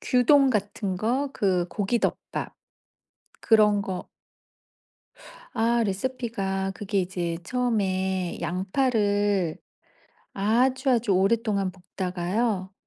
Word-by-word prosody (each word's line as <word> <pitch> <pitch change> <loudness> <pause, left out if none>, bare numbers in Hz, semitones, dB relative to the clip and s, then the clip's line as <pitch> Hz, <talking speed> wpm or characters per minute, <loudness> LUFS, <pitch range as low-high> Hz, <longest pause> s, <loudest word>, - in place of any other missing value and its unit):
규동 270 +2 +4
같은 205 -3 -2
거 260 +7 0
그 185 -3 +1
고기 210 +3 0
덮밥. - - -3 0.9
그런 210 -2 +4
거 190 -2 -5 1.4
아 235 0 +2
레시피가 195 -3 -2
그게 200 0 -1
이제 175 -2 -3
처음에 190 -6 -1
양파를 205 - 0 0.8
아주, 250 +7 +2
아주 235 -4 +2
오랫동안 200 0 +1
볶다가요. 185 +2 -2
205 Hz, 185 characters per minute, -26 LUFS, 190-235 Hz, 1.4 s, 규동